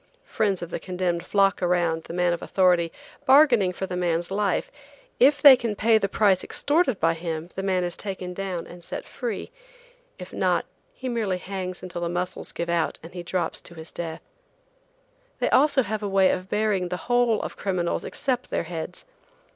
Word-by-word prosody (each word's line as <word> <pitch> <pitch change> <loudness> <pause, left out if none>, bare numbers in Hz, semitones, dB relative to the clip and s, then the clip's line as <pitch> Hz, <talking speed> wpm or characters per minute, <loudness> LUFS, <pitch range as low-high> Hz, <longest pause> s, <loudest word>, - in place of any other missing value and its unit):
Friends 200 -5 0
of 175 - -7
the - - -3
condemned 180 -2 -2
flock 195 -1 +2
around 175 -2 +1
the - - -8
man 180 0 +2
of 170 - -4
authority, 180 -3 +2 0.4
bargaining 260 -9 +6
for 185 +2 -4
the 185 -1 -5
man's 175 0 -1
life; 200 -1 0 0.5
if 285 +3 +5
they 280 -3 +11
can 235 -4 -3
pay 220 +1 +4
the 200 - -1
price 195 -3 +3
extorted 290 - +1
by 165 +1 +3
him 165 0 -5
the 190 - -4
man 190 -2 +1
is 175 -1 -2
taken 190 -3 -5
down 185 -2 -4
and 175 0 -11
set - - -6
free; 240 - -5 0.7
if - - -10
not, - - +1 0.3
he 380 - -7
merely 220 -7 -1
hangs 185 -1 -6
until 175 -1 -6
the 170 - -1
muscles 180 +1 -3
give 170 - -4
out 170 -1 0
and 165 - -11
he 180 - -5
drops 175 -1 -2
to 170 - -12 0.2
death. 165 -2 -5 1.1
They - - 0
also 280 -1 +4
have 215 0 -3
a 205 - -2
way 195 -1 +4
of 185 +1 -4
burying 210 -4 0
the 180 - -2
whole 245 -2 +3
of - - -5
criminals 185 -3 -1
except 255 -3 -2
their - - -1
heads. 165 +1 -7
185 Hz, 185 wpm, -25 LUFS, 175-215 Hz, 1.1 s, they